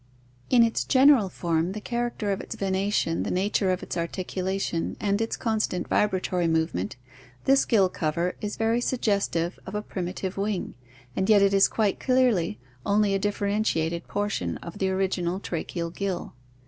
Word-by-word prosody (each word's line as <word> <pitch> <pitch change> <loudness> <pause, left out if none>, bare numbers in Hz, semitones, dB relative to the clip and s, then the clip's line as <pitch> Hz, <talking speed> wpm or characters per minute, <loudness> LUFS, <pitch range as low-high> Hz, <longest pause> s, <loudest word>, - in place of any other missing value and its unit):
In 245 -2 +6
its 230 -1 +1
general 260 -6 +5
form, 170 0 -1
the 215 - -4
character 235 -2 -2
of 195 - -2
its - - -7
venation, 195 -3 0
the - - -3
nature 195 +1 +1
of 185 0 0
its - - -5
articulation, 185 0 -2
and 200 +1 0
its 225 - -1
constant 220 -5 -1
vibratory 185 -3 +1
movement, 160 - 0 0.5
this 270 0 +4
gill 205 -6 +4
cover 170 +1 -1
is 210 0 -3
very 225 +2 +1
suggestive 200 -8 0
of 190 - -6
a 210 - -2
primitive 185 0 -4
wing, 200 -1 -2 0.4
and 190 +2 0
yet 205 -2 +6
it 200 0 +3
is 195 0 +6
quite 210 -3 0
clearly 250 - +2 0.2
only 205 0 +2
a 195 - +1
differen 205 +1 0
tiated 170 -4 -1
portion 205 0 -2
of 170 +4 -9
the 190 - +1
original 190 -1 0
tracheal 170 -2 -4
gill. 195 -2 -3
195 Hz, 160 wpm, -26 LUFS, 180-210 Hz, 0.5 s, In